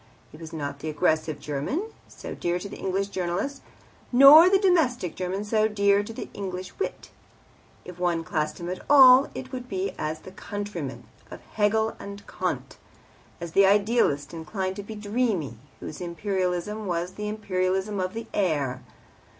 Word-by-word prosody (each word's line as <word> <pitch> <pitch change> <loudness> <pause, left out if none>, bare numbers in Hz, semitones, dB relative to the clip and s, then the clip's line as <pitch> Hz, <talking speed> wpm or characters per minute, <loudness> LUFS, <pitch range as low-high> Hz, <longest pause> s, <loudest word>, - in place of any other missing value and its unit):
He - - -12
was 165 -1 -9
not 140 -3 -5
the 155 - -4
aggressive 155 -1 0
German, 205 - -3 0.2
so - - -8
dear 175 0 -1
to 180 - -6
the - - -9
English 195 +1 -1
journalist, 195 +9 -3 0.5
nor 280 +7 +9
the 390 - +5
domestic 315 - +2
German, 185 +2 -3
so 215 0 +2
dear 200 -1 +3
to 205 - -7
the 225 - -7
English 185 -2 -6
wit. - - -4 0.7
If 180 -1 -10
one 175 -2 0
classed 155 -2 -2
him 175 - -6
at 180 +1 -4
all 265 -1 +8
it 260 - -7
would 250 -1 -6
be 190 -1 -2
as 155 +1 -3
the 185 - -11
countryman 200 -7 -6 0.3
of - - -10
Hegel 220 +1 +1
and 200 0 -9
Kant, - - -4 0.6
as 170 -1 -6
the 195 +3 +5
idealist, 200 -8 +2
inclined 185 +4 -4
to - - -4
be 215 +2 -8
dreamy, 205 - -1 0.2
whose 155 - -8
Imperialism 185 +3 -2
was 175 0 -2
the 210 +2 -5
Imperialism 190 -1 -1
of 185 +3 -2
the 230 0 -5
air. 145 -10 0
190 Hz, 165 wpm, -26 LUFS, 170-215 Hz, 0.7 s, nor